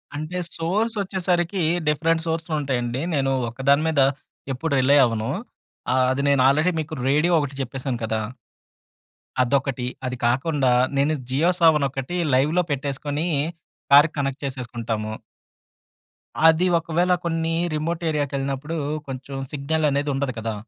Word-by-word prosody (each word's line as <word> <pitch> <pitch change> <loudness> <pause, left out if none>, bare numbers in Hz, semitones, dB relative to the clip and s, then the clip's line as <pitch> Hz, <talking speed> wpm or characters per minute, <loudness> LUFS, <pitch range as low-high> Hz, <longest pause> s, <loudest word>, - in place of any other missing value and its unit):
అంటే 155 +4 -4 0.2
సోర్స్ 205 +8 0
వచ్చేసరికి 180 -1 0 0.3
different 160 +2 +1
sources 160 0 -2
ఉంటాయండి. 125 -3 -2
నేను 135 -1 +1 0.2
ఒక్కదాని 135 +5 +2
మీద 155 -3 +2 0.5
ఎప్పుడు 150 +4 -2
రిలై 140 +3 +5
అవ్వను. 115 -2 -2 0.6
ఆహ్, 130 0 +3
అది 130 +1 -1
నేను 140 -2 +3
ఆల్రెడీ 155 +6 +3
మీకు 155 +1 -8 0.2
రేడియో 150 +5 +3
ఒకటి 145 -2 -3
చెప్పేసాను 130 -1 -4
కదా! 110 0 -1 1.2
అదొకటి, 135 -1 0 0.2
అది 125 0 -3
కాకుండా 135 +1 +1 0.3
నేను 145 +3 +2 0.2
జియో 150 +7 +2
సావన్ 160 -4 +5
ఒకటి 135 +5 -5 0.2
లైవ్‌లో 150 +7 +3
పెట్టేసుకొని 145 +3 -2 0.6
కార్‌కి 145 +3 +7
కనెక్ట్ 140 0 -2
చేసేసుకుంటాము. 120 -5 -4 1.4
అది 160 +3 +4
ఒకవేళ 170 +2 0
కొన్ని 165 -1 -1 0.2
రిమోట్ 165 +2 -2
ఏరియాకెళ్ళినప్పుడు 140 0 -2 0.3
కొంచెం 135 +1 -7 0.2
సిగ్నల్ 150 +2 -1
అనేది 140 +1 0
ఉండదు 135 -1 -1
కదా! 110 0 -3
140 Hz, 125 wpm, -23 LUFS, 130-160 Hz, 1.4 s, కార్‌కి